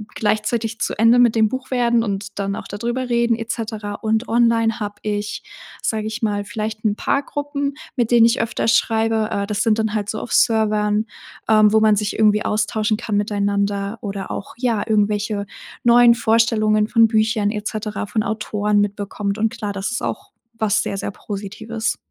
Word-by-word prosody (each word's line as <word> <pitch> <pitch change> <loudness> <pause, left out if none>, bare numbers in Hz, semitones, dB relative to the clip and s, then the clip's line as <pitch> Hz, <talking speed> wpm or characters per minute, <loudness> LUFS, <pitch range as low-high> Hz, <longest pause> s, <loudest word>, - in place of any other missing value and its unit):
gleichzeitig 220 +1 -1
zu - - -2
Ende 230 +3 +5
mit 235 -2 +4
dem 220 -1 +3
Buch 260 +1 -6
werden 235 -2 +2
und 200 -1 -4
dann 200 0 -1
auch - - -7
da 205 - -5
drüber 240 +3 -3
reden 235 -1 +2
et 225 0 -4
cetera. 215 -3 -4
Und 220 +3 -1
online 230 -1 +2
habe 205 -1 -4
ich, 210 0 -3 0.4
sage 215 -1 -1
ich 220 +2 -5
mal, 205 -2 -1
vielleicht 215 +1 -5
'n 205 -1 +2
paar 280 - 0
Gruppen, 285 -1 -3 0.2
mit 240 -1 0
denen 235 -1 +6
ich 230 - +2
öfter 230 - -2
schreibe. 225 -1 +2
Äh, 200 0 -1
das 210 -1 -1
sind 225 -1 +2
dann 220 -1 0
halt 205 -1 -1
so 215 - -3
auf - - -7
Servern, 215 -2 +2 0.4
ähm, 215 -1 +5
wo 220 - +6
man 215 -1 +4
sich 205 0 -1
irgendwie 210 -1 +3
austauschen 215 0 0
kann 220 -3 -2
miteinander 200 0 -1
oder 195 -2 -5
auch, 200 - -6
ja, 235 -4 0
irgendwelche 210 -1 0 0.4
neuen 240 0 +7
Vorstellungen 220 -2 +2
von 230 0 +5
Büchern 215 -1 +1
et 210 -1 -5
cetera 215 -1 -4
von 215 +1 0
Autoren 210 -1 0
mitbekommt. 205 0 -3
Und 225 +1 +2
klar, 210 -3 -5
das 195 -1 -3
ist 235 - -3
auch 395 +1 -4 0.3
was 220 0 +2
sehr, 195 - -3
sehr 195 - -3
Positives. 220 +3 -4
215 Hz, 185 wpm, -20 LUFS, 205-230 Hz, 0.4 s, neuen